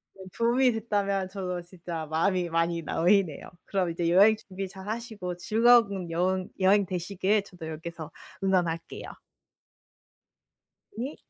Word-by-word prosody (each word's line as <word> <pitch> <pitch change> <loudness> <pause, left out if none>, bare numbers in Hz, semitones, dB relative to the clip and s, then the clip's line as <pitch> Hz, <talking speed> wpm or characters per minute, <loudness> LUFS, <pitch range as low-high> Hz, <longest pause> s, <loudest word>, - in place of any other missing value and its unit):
네. 190 - -11
도움이 245 +2 +3
됐다면 200 -3 -1
저도 185 -2 -4
진짜 170 -2 -6
마음이 175 +3 0
많이 165 0 0
놓이네요. 175 -1 +1 0.2
그럼 190 -3 0
이제 170 0 -1
여행 200 +5 +6
준비 195 -2 -6
잘하시고 200 -1 -6
즐거운 220 -4 +3
여행 185 +2 0
여행 195 +2 +4
되시길 190 +3 0
저도 180 -4 -10
여기에서 160 0 -7 0.3
응원할게요. 175 -4 -1 1.9
네. 255 +6 -4
185 Hz, 285 characters per minute, -27 LUFS, 170-205 Hz, 1.9 s, 여행